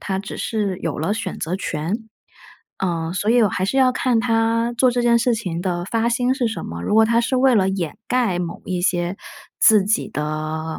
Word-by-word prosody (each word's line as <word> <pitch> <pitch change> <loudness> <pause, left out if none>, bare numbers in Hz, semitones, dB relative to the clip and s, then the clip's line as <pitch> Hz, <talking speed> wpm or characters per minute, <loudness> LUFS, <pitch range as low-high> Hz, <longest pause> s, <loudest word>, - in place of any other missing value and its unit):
他 190 - -3
只 200 - -7
是 205 -5 -2
有 160 - -3
了 165 +7 0
选 220 0 -4
择 170 +4 -2
权。 190 +6 -4 0.7
呃， 170 -3 -2
所 205 +4 0
以 240 0 +5
我 210 - +4
还 185 - -2
是 195 - -1
要 260 -1 +5
看 250 -2 +1
他 230 0 +1
做 255 -1 +5
这 245 0 -1
件 235 0 +4
事 235 0 +2
情 180 -7 -4
的 175 -2 -2
发 230 +3 0
心 250 +2 +1
是 250 -4 0
什 220 - -5
么， 85 +1 -6
如 205 - -1
果 220 0 +6
他 230 +1 +2
是 255 +2 0
为 260 0 +4
了 190 -3 +3
掩 185 -5 -3
盖 240 -8 +1
某 175 -1 -5
一 180 -1 -2
些 175 0 0 0.4
自 215 -4 +5
己 210 +2 0
的 155 +1 -4
205 Hz, 235 characters per minute, -21 LUFS, 175-235 Hz, 0.7 s, 果